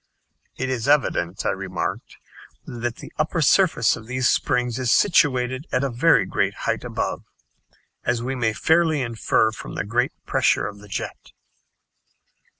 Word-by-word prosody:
"It 130 - -2
is 120 -2 -2
evident," 100 - +1
I - - +2
remarked, - - -4 0.5
"that 120 0 -4
the - - -12
upper 160 +3 0
surface 160 - +3
of 110 - -11
these 125 0 0
springs 125 -1 0
is 125 -2 0
situated 130 -6 +2
at 125 - +1
a 135 - -1
very 120 -4 +4
great - - -1
height - - -1
above - - -3 0.8
as 120 -1 -1
we 130 +2 -2
may 115 -4 0
fairly 160 +2 +2
infer 115 -1 +1
from 110 - -9
the - - -3
great 120 +4 0
pressure - - +2
of 100 0 -7
the 105 - -14
jet." 100 - -6
125 Hz, 155 wpm, -23 LUFS, 115-140 Hz, 0.8 s, very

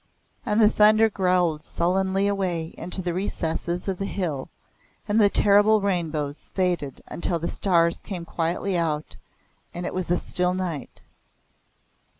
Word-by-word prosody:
And 210 +1 +2
the 215 - +7
thunder 215 +1 +5
growled 180 -5 +1
sullenly 190 +4 0
away 180 -5 -1
into 185 +1 -5
the 175 -1 -1
recesses 175 -1 -3
of 190 -2 -2
the 195 - -2
hill 160 -10 -3 0.6
and 210 +2 +3
the 205 - +6
terrible 205 +2 +5
rainbows 160 -7 -2
faded 175 -7 -1
until 170 0 -2
the 165 +1 -3
stars 170 -3 +2
came 180 -5 -6
quietly 170 +4 -2
out 155 -3 -2 0.6
and 175 0 -4
it - - -4
was 185 -2 -3
a 175 - +3
still 180 0 -1
night. 170 -8 -5
180 Hz, 145 wpm, -24 LUFS, 170-195 Hz, 0.6 s, the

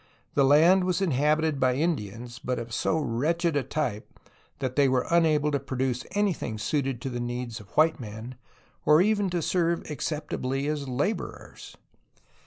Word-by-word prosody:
The 140 - +3
land 165 +7 +6
was 180 -1 0
inhabited 155 -2 +1
by 130 -1 +2
Indians, 120 - -3
but 125 0 -2
of 115 -1 -6
so 160 - +1
wretched 160 +5 0
a 145 - +2
type 130 -5 -4 0.4
that 130 -1 -3
they 140 -2 +4
were 130 -1 +1
unable 155 -3 +3
to 140 - +1
produce 130 -2 -2
any 205 -2 +2
thing 110 -8 -5
suited 130 +3 -1
to 135 - -3
the 120 - -3
needs 120 -1 -4
of 105 -2 -14
white 160 +1 +4
men 110 +1 -7 0.5
or 150 +3 +6
even 205 -1 +1
to 175 -2 -1
serve 170 -1 0
acceptably 140 -3 -3
as 145 -2 -2
laborers. 145 - -4
140 Hz, 165 wpm, -27 LUFS, 125-160 Hz, 0.5 s, land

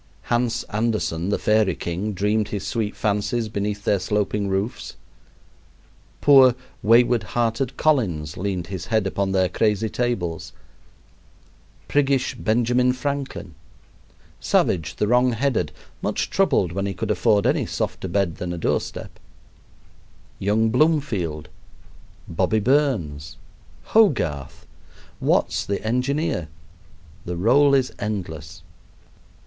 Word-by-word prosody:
Hans 120 0 0
Andersen, 105 -6 -1
the 100 - +1
fairy 105 -4 +2
king, 95 +5 -3
dreamed 105 +3 0
his 105 -2 -4
sweet 110 -4 -2
fancies 105 +2 -1
beneath 105 0 -3
their 100 - +2
sloping 105 +1 -1
roofs. 95 +4 -3 1.3
Poor, 135 -4 +7 0.3
wayward 120 +1 +4
hearted 115 +4 -1
Collins 90 - +1
leaned 95 -2 -3
his 90 -1 -6
head 110 -3 +1
upon 95 0 -1
their 95 -1 +2
crazy 105 +3 0
tables; 95 -11 -2 1.3
priggish 140 -2 +1
Benjamin 120 +3 +1
Franklin; 135 - -4 0.9
Savage, 80 -4 +1
the 105 - 0
wrong 125 +2 +3
headed, 130 +2 0 0.3
much - - -2
troubled 90 - +2
when 100 +3 -2
he 100 - -4
could 110 +2 -2
afford 105 -1 +2
any - - +1
softer - - -3
bed 90 -2 -1
than 90 -1 -4
a - - -5
doorstep; 80 - -3 1.2
young 110 +3 +2
Bloomfield, 115 - 0 0.8
"Bobby" 95 +6 +1
Burns, 105 - 0 0.5
Hogarth, 130 - +1 0.5
Watts - - +1
the 100 - -2
engineer 125 - -1 0.8
the 90 0 -5
roll 140 +9 +4
is 130 -2 +1
endless. 85 -8 -5
105 Hz, 110 wpm, -23 LUFS, 95-125 Hz, 1.3 s, Poor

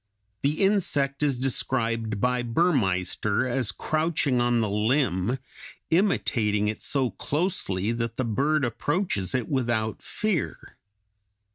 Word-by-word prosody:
The 150 +7 +1
insect 145 -9 +2
is 140 -4 +1
described 115 -4 0
by 125 +2 +1
Burmeister 115 - +1
as 125 -4 0
crouching 155 -4 0
on 120 0 +2
the 110 - +1
limb, 105 0 +1 0.5
imitating 115 - +2
it 110 - -3
so 135 -4 0
closely 140 - -1
that 115 -1 -3
the 130 - 0
bird 140 +7 +1
approaches 125 - -1
it 125 -3 -1
without 120 -5 -1
fear. 205 - -3
125 Hz, 115 wpm, -26 LUFS, 110-145 Hz, 0.5 s, insect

